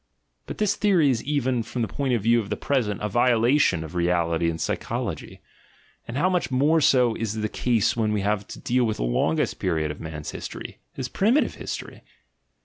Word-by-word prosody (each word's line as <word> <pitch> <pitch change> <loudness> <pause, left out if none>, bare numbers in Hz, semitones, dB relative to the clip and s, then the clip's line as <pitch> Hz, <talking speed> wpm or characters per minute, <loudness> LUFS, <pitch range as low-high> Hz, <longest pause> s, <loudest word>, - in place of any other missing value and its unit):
But - - -6
this 205 -1 +1
theory 180 -9 +3
is 115 -3 -1
even, 130 -4 0
from 115 +1 -3
the - - -1
point 135 -3 -1
of 110 - -2
view 115 +2 +4
of 105 -3 -5
the 105 - -2
present, 110 -8 -1
a - - +1
violation 120 - +3
of 80 - -9
reality 85 -1 +1
and 80 0 -4
psychology: - - -4 0.7
and 115 - -5
how 170 +6 +3
much 180 -9 0
more 145 +5 +3
so 125 -4 +4
is 110 -1 -3
the 110 -1 -1
case 115 0 +1
when 110 -2 0
we 105 -1 0
have 105 0 -1
to - - -9
deal 125 +1 +1
with 110 -2 -1
the - - -2
longest - - 0
period 80 -2 0
of 75 - -9
man's 80 -2 -6
history, - - -8
his 130 - -4
primitive 230 - +2
history! - - -7
115 Hz, 200 wpm, -24 LUFS, 95-135 Hz, 0.7 s, view